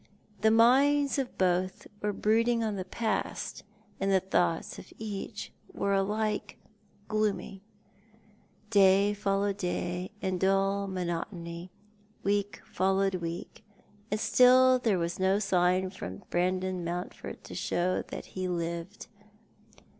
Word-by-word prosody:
The 220 Hz, -, +4 dB
minds 275 Hz, +6 st, +4 dB
of 260 Hz, -2 st, -4 dB
both 185 Hz, 0 st, 0 dB, 0.2 s
were 210 Hz, -, 0 dB
l)rooding 230 Hz, +3 st, +2 dB
on 215 Hz, -2 st, -1 dB
the 190 Hz, -, -3 dB
past, 215 Hz, +3 st, -3 dB, 0.4 s
and 195 Hz, 0 st, +1 dB
the 190 Hz, -, +5 dB
thoughts 175 Hz, -3 st, 0 dB
of -, -, -13 dB
each 210 Hz, 0 st, -6 dB, 0.2 s
were 200 Hz, 0 st, -1 dB
alike 210 Hz, +2 st, -1 dB, 0.5 s
glooraj'. 205 Hz, -3 st, -1 dB, 1.1 s
Day 200 Hz, 0 st, +5 dB
followed 200 Hz, -1 st, 0 dB
day 180 Hz, 0 st, -2 dB
in 190 Hz, -2 st, -1 dB
a -, -, -8 dB
dull 195 Hz, +1 st, +2 dB
monotony, 175 Hz, -1 st, -4 dB, 0.5 s
week 200 Hz, -2 st, 0 dB
followed 195 Hz, +1 st, +1 dB
week, 170 Hz, +5 st, -6 dB, 0.5 s
and 210 Hz, -, -1 dB
still 255 Hz, +2 st, +6 dB
there 220 Hz, -6 st, +2 dB
was 170 Hz, +1 st, -2 dB
no 190 Hz, +1 st, +3 dB
sign 185 Hz, -2 st, +2 dB
from 95 Hz, -, -8 dB
Brandon 185 Hz, +1 st, 0 dB
Mountford 175 Hz, +1 st, -5 dB
to -, -, -10 dB
show 180 Hz, +1 st, 0 dB
that -, -, -7 dB
ho 185 Hz, -, -3 dB
lived. 170 Hz, +2 st, -4 dB
195 Hz, 125 wpm, -29 LUFS, 180-210 Hz, 1.1 s, still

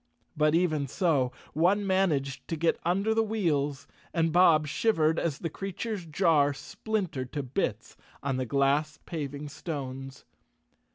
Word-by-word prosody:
But 150 Hz, +1 st, +3 dB
even 155 Hz, -5 st, +1 dB
so, 145 Hz, -6 st, +1 dB, 0.2 s
one 185 Hz, +7 st, +3 dB
managed 165 Hz, -9 st, 0 dB
to 165 Hz, -, -2 dB
get 165 Hz, +1 st, +1 dB
under 195 Hz, +6 st, +1 dB
the 225 Hz, -, +3 dB
wheels 155 Hz, -10 st, 0 dB, 0.3 s
and 165 Hz, -1 st, +2 dB
Bob 170 Hz, -4 st, +6 dB
shivered 160 Hz, -1 st, +2 dB
as 155 Hz, -5 st, -1 dB
the 165 Hz, -, -3 dB
crea¬ 195 Hz, +1 st, -6 dB
ture's 210 Hz, -7 st, -3 dB
jar 150 Hz, -3 st, +3 dB
splintered 170 Hz, -, -3 dB
to 145 Hz, -, -2 dB
bits 125 Hz, -, -3 dB, 0.3 s
on 135 Hz, -2 st, -1 dB
the 130 Hz, -1 st, -2 dB
glass 140 Hz, +4 st, +1 dB
paving 145 Hz, -2 st, -5 dB
stones. 135 Hz, -3 st, -6 dB
155 Hz, 145 wpm, -28 LUFS, 140-180 Hz, 0.3 s, Bob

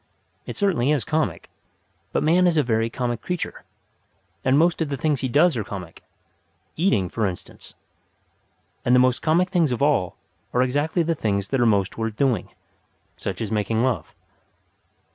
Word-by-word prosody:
It -, -, -6 dB
certainly 180 Hz, -, +1 dB
is 150 Hz, -6 st, +2 dB
comic; 155 Hz, 0 st, -1 dB, 0.6 s
but -, -, 0 dB
man 175 Hz, +4 st, +4 dB
is 170 Hz, -2 st, +2 dB
a 150 Hz, -, +4 dB
very 115 Hz, -2 st, 0 dB
comic 120 Hz, -1 st, -3 dB
creature, 180 Hz, -1 st, -4 dB, 0.8 s
and 130 Hz, +1 st, +3 dB
most 165 Hz, +1 st, +3 dB
of 160 Hz, -, 0 dB
the 140 Hz, -, -2 dB
things 145 Hz, -1 st, 0 dB
he 130 Hz, -, 0 dB
does 155 Hz, +5 st, +4 dB
are 110 Hz, -, -1 dB
comic 90 Hz, -4 st, -8 dB, 0.7 s
eating, 155 Hz, -, +2 dB
for 110 Hz, +4 st, -1 dB
instance. 90 Hz, -2 st, -9 dB, 1.1 s
And 125 Hz, -, +4 dB
the -, -, +6 dB
most 125 Hz, -1 st, +3 dB
comic 170 Hz, +4 st, +2 dB
things 165 Hz, -6 st, +2 dB
of 125 Hz, +3 st, -1 dB
all 140 Hz, -12 st, +1 dB, 0.4 s
are 125 Hz, -, +3 dB
exactly 145 Hz, +7 st, 0 dB
the 165 Hz, +1 st, 0 dB
things 100 Hz, -9 st, -1 dB
that 135 Hz, -2 st, +1 dB
are 120 Hz, -, +4 dB
most 100 Hz, -1 st, +1 dB
worth 110 Hz, -1 st, -2 dB
doing 125 Hz, -6 st, 0 dB, 0.7 s
such -, -, -5 dB
as 110 Hz, -2 st, -3 dB
making 110 Hz, +2 st, 0 dB
love. 110 Hz, -12 st, -2 dB
130 Hz, 170 wpm, -23 LUFS, 110-155 Hz, 1.1 s, the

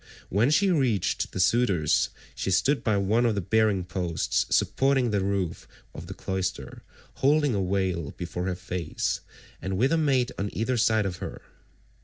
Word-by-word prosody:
When 105 Hz, +7 st, +2 dB
she 190 Hz, +6 st, +3 dB
reached 125 Hz, -, 0 dB
the -, -, -5 dB
suitors, 90 Hz, -6 st, +2 dB, 0.2 s
she -, -, -3 dB
stood 135 Hz, +10 st, +2 dB
by 110 Hz, -3 st, +2 dB
one 105 Hz, +5 st, +2 dB
of 115 Hz, -3 st, +2 dB
the -, -, 0 dB
bearing 105 Hz, 0 st, +2 dB
posts 90 Hz, -2 st, -1 dB
supporting 135 Hz, -3 st, +2 dB
the 100 Hz, -2 st, +1 dB
roof 95 Hz, -4 st, -2 dB, 0.3 s
of -, -, -9 dB
the -, -, -7 dB
cloister, 95 Hz, -1 st, -4 dB, 0.4 s
holding 145 Hz, -1 st, +3 dB
a 100 Hz, -, 0 dB
veil 90 Hz, -5 st, -1 dB
before 90 Hz, +1 st, -4 dB
her 90 Hz, -, -1 dB
face, 90 Hz, -3 st, -3 dB, 0.4 s
and 95 Hz, 0 st, -3 dB
with 130 Hz, +7 st, +2 dB
a 165 Hz, -, +3 dB
maid 135 Hz, -5 st, +2 dB
on 100 Hz, +1 st, -1 dB
either 120 Hz, +4 st, 0 dB
side 110 Hz, -2 st, +2 dB
of 90 Hz, -2 st, -3 dB
her. -, -, -7 dB
100 Hz, 170 wpm, -26 LUFS, 95-125 Hz, 0.4 s, she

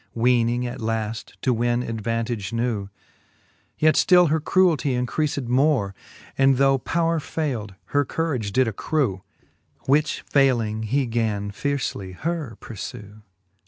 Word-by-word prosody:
Weening 120 Hz, 0 st, +2 dB
at 125 Hz, +1 st, -5 dB
laft 110 Hz, 0 st, -3 dB
to 130 Hz, -, +3 dB
win 120 Hz, +1 st, 0 dB
advantage 115 Hz, -1 st, -3 dB
new; 115 Hz, -4 st, -2 dB, 0.9 s
Yet 155 Hz, 0 st, +4 dB
ftill 180 Hz, -3 st, +5 dB
her 160 Hz, +2 st, +2 dB
cruel 180 Hz, +2 st, +3 dB
tie 140 Hz, 0 st, -2 dB
increaled 130 Hz, +2 st, -1 dB
more. 125 Hz, -5 st, +2 dB, 0.5 s
And 135 Hz, -1 st, +5 dB
though 135 Hz, 0 st, +4 dB
powre 165 Hz, +3 st, 0 dB
faild, 125 Hz, -12 st, -3 dB, 0.2 s
her 145 Hz, 0 st, +4 dB
courage 135 Hz, -8 st, -2 dB
did 130 Hz, +3 st, +3 dB
accrew. 115 Hz, -, -1 dB, 0.6 s
Which 145 Hz, +3 st, +1 dB
fayling, 120 Hz, -6 st, +2 dB
he 135 Hz, +2 st, +2 dB
gan 110 Hz, -4 st, -1 dB
fiercely 115 Hz, -6 st, -3 dB
her 150 Hz, -, -4 dB
purfew. 105 Hz, -1 st, -8 dB
125 Hz, 125 wpm, -23 LUFS, 110-145 Hz, 0.9 s, ftill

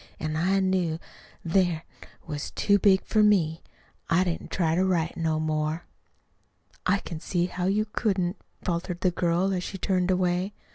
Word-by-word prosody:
An' 155 Hz, 0 st, -2 dB
I 185 Hz, +5 st, +2 dB
knew 185 Hz, -4 st, +1 dB, 0.5 s
then't 170 Hz, -2 st, +2 dB, 0.4 s
was 150 Hz, -3 st, -4 dB
too 205 Hz, -1 st, +2 dB
big 190 Hz, -1 st, +4 dB
for 215 Hz, -, +2 dB
me. 175 Hz, -6 st, +3 dB, 0.5 s
I 170 Hz, +2 st, +4 dB
didn't 175 Hz, -2 st, -3 dB
try 165 Hz, -4 st, +1 dB
to 180 Hz, +3 st, +2 dB
write 170 Hz, -3 st, +1 dB
no 160 Hz, -2 st, 0 dB
more." 155 Hz, +1 st, -1 dB, 1.0 s
"I 190 Hz, +2 st, +4 dB
can 165 Hz, -4 st, -7 dB
see 175 Hz, +1 st, 0 dB
how 180 Hz, 0 st, -3 dB
you 210 Hz, +2 st, +2 dB
couldn't," 195 Hz, -4 st, -1 dB, 0.3 s
faltered 175 Hz, 0 st, -2 dB
the 185 Hz, -, +3 dB
girl, 175 Hz, +2 st, +1 dB
as 180 Hz, -1 st, -1 dB
she 195 Hz, -, -5 dB
turned 185 Hz, -1 st, 0 dB
away. 185 Hz, +1 st, +1 dB
180 Hz, 160 wpm, -27 LUFS, 165-190 Hz, 1.0 s, big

